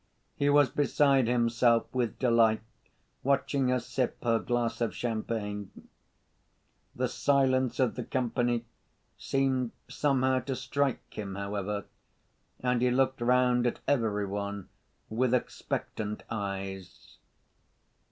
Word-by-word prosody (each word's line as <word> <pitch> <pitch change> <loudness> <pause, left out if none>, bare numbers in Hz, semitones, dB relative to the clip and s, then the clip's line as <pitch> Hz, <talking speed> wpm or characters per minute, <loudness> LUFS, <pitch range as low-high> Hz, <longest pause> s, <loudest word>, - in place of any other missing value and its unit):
He 145 - +1
was 145 -1 +5
beside 140 -3 +3
himself 120 -1 +3
with 120 -4 -1
delight, 115 -3 +3 0.6
watching 140 0 +1
her 125 0 +2
sip 125 +1 -2
her 115 -2 +3
glass 120 0 -1
of 115 - 0
champagne. 110 -3 -3 1.3
The - - 0
silence 130 -3 +2
of 130 -2 +2
the 125 - -4
company 120 -1 0 0.5
seemed 130 -3 0
somehow 130 -2 +1
to 130 +1 -4
strike 130 +1 -1
him, 100 -2 -5
however, 100 0 -3 0.8
and 125 -1 +1
he 125 - +4
looked 130 0 +1
round 125 0 +3
at 120 - -1
every 110 -7 +1
one 100 0 -4 0.4
with 125 +3 +1
expectant 105 -3 -3
eyes. 95 -3 -6
120 Hz, 115 wpm, -29 LUFS, 110-130 Hz, 1.3 s, was